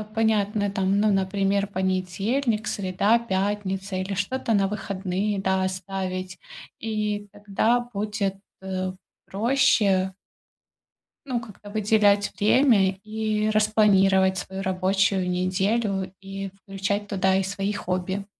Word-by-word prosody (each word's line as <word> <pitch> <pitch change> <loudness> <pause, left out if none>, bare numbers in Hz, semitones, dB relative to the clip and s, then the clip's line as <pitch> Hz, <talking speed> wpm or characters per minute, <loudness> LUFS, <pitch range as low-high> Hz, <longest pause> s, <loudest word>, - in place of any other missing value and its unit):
понятно, 210 -2 +1
там, 195 0 +1
ну, 215 -1 +3
например, 195 +1 +1
понедельник, 195 +5 -1
среда, 200 +4 +1
пятница 195 -2 -2
или 185 +1 -3
что-то 225 +5 -1
на 195 -2 +2
выходные, 200 0 -2
да, 190 -1 +1
оставить, 185 0 -4 0.4
и 210 -2 -2
тогда 210 +4 +1
будет, 205 -1 -2 0.3
э, 185 -1 -3 0.3
проще 200 -4 +2 1.1
ну, 250 -3 -1
как-то 210 -2 -12
выделять 205 -1 +3
время 210 -3 +4
и 215 0 -1
распланировать 195 -3 +4
свою 190 +2 -6
рабочую 190 0 +1
неделю, 190 +2 0
и 195 0 -6
включать 200 +1 -2
туда 190 -1 +1
и 195 - +2
свои 195 +1 -2
хобби. 185 +1 -3
195 Hz, 110 wpm, -25 LUFS, 190-210 Hz, 1.1 s, время